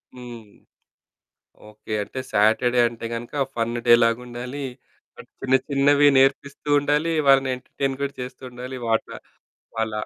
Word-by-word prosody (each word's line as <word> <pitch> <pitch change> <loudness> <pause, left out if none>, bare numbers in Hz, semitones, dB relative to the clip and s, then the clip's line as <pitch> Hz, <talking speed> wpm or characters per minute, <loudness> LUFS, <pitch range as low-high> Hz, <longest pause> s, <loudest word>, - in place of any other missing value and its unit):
హ్మ్. 120 -4 -10 1.2
ఓకే. 105 +1 -9
అంటే 130 - -7
సాటర్డే 110 +4 +3
అంటే 115 0 -9
గనుక 120 +5 -3
ఫన్ 115 0 -1
డే 120 - +8
లాగా 115 +1 +2
ఉండాలి. 125 +3 -6 0.5
అంటే - - -13
చిన్న 130 0 +2
చిన్నవి 145 +1 +4
నేర్పిస్తూ 140 +2 0
ఉండాలి. 150 +3 0 0.2
వాళ్ళని 135 -1 +5
ఎంటర్టైన్ 135 +1 -4
కూడా 140 - -3
చేస్తూ 125 +1 -8
ఉండాలి. 125 +1 -7
వాట 115 0 +1 0.7
వాళ్ళ 110 0 -1
125 Hz, 130 wpm, -23 LUFS, 115-140 Hz, 1.2 s, డే